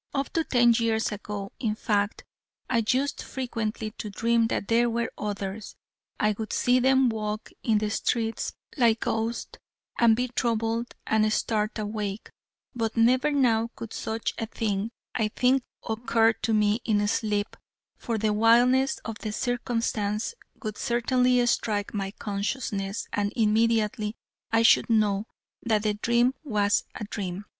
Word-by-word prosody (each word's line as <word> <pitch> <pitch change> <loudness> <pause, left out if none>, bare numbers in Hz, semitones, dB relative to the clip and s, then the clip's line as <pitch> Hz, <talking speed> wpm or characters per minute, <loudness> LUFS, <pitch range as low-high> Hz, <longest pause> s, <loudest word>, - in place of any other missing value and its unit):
Up 275 0 -2
to 330 - +1
ten 240 -4 +4
years 225 -1 +1
ago, 205 -1 -5
in 220 -4 -1
fact, 210 -2 -1 0.4
I 230 -2 +1
used 270 +2 +1
frequently 225 -4 -4
to 210 - -4
dream 230 +2 +2
that 200 - -2
there 235 +1 +3
were 235 0 -1
others. 205 0 -5 0.4
I 210 - +3
would 220 - -4
see 250 +1 +3
them 265 +1 +4
walk 215 -1 -4
in 220 -3 +2
the 210 0 -1
streets 225 0 -1 0.2
like 230 -4 +3
ghosts, 225 +1 -2 0.4
and 230 -2 +6
be 250 +2 0
troubled, 230 -1 -1
and 215 0 +2
start 215 0 0
awake: 210 -1 -4 0.4
but 230 -2 -2
never 255 +5 +4
now 235 -5 +2
could 230 - -8
such 220 +1 -3
a 225 - -2
thing, 215 -1 -2 0.2
I 220 -3 +1
think, 255 +5 +2 0.3
occur 225 0 +2
to 220 +1 -3
me 210 +1 +2
in 205 -2 +1
sleep: 210 -1 -1 0.4
for 230 -2 -3
the 215 0 +1
wildness 245 +5 +4
of 225 0 -5
the 215 - -4
circumstance 230 - -1 0.3
would 215 -2 -4
certainly 250 +1 +2
strike 210 -3 0
my 195 -2 -2
consciousness, 200 0 -3
and 205 0 0
immediately 220 0 +1 0.4
I 225 0 +4
should 230 - +5
know 210 -2 +2 0.3
that 220 -3 +1
the 210 -1 +1
dream 235 +4 +2
was 205 -7 +1
a - - -5
dream. 200 -2 -5
225 Hz, 150 wpm, -26 LUFS, 210-235 Hz, 0.4 s, and